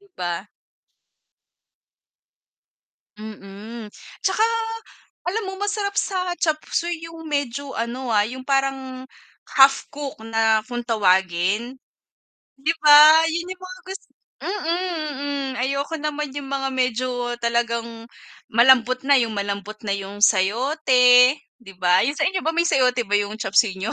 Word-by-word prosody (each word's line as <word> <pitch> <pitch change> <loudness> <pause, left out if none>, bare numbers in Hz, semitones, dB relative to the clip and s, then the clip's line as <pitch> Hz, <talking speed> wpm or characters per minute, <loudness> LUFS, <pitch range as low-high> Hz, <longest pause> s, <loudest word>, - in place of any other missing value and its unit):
'Di 400 - -24
ba? 175 +3 -4 2.7
Mm, 215 +1 -10 0.3
'tsaka 385 +3 +2 0.8
alam 415 +6 -1
mo - - -7
masarap 410 -1 -2
sa 370 -2 -1
chopseuy 330 +2 -1
'yung 330 -1 -10
medyo 285 -2 -3
ano, 240 +2 -4
ah, 210 -1 +4
'yung 255 +4 -7
parang 270 -2 -2 0.5
half 275 0 +5
cooked 285 -6 -7
na 225 -1 +1
kung 240 0 -3
tawagin, 190 +1 +1 0.8
'di 290 +4 0
ba? 305 +1 +8
'Yun 340 +2 -3
'yung 370 0 -15
mga 370 0 -9
gus 385 +1 -7 0.4
mm, 410 +2 -3
mm. 305 -6 -3
Ayoko 275 +4 -2
naman 300 -1 -4
'yung 285 -1 -6
mga 270 0 -2
medyo 255 -1 -1 0.3
talagang 235 -1 -2 0.4
malambot 250 +1 +4
na 285 - +5
'yung 230 -2 -2
malambot 200 +1 -4
na 200 - 0
'yung 200 +1 -7
sayote, 250 +5 +4 0.2
'di 195 -5 -13
ba? 180 0 +3
'Yun 280 +5 -1
sa - - +1
inyo 375 0 -1
ba 320 - -1
may 340 0 +2
sayote 250 -5 +2
ba 205 - -1
'yung 205 +1 0
chopseuy 205 -1 +2
niyo? 210 +5 -3
255 Hz, 135 wpm, -22 LUFS, 220-300 Hz, 2.7 s, ba